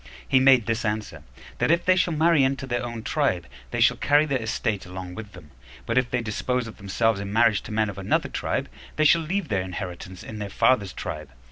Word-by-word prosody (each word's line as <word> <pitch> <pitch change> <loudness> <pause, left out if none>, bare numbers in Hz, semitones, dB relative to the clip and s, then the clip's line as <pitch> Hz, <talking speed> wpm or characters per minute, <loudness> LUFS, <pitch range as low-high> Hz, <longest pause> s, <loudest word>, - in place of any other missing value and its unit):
He 130 - +4
made 130 -3 +5
this 115 -1 -1
answer, 105 -1 -3 0.4
That - - +1
if 170 +1 +2
they 185 - +5
shall 185 -3 +1
marry 160 -2 +4
into 135 0 0
their 120 -2 -2
own 120 -2 -5
tribe, 125 - 0 0.2
they - - -3
shall - - +4
carry 145 +1 +3
their 135 -4 -1
estate 110 -2 -2
along 90 0 -7
with 105 -1 -9
them; 75 -5 -14 0.3
but 115 - -2
if 130 -1 +2
they 125 - 0
dispose 125 +3 -1
of 115 - -10
themselves 105 +2 0
in 100 0 -5
marriage 115 -2 +3
to - - -10
men 110 0 +1
of 100 -1 -6
another 95 - 0
tribe, - - -2 0.3
they 155 - +2
shall 165 +2 +5
leave 175 +1 -2
their 100 -3 +1
inheritance 90 -1 -7
in 110 - -8
their 100 -1 -4
father's 100 -1 +2
tribe. 75 -1 -6
115 Hz, 225 wpm, -25 LUFS, 100-135 Hz, 0.4 s, made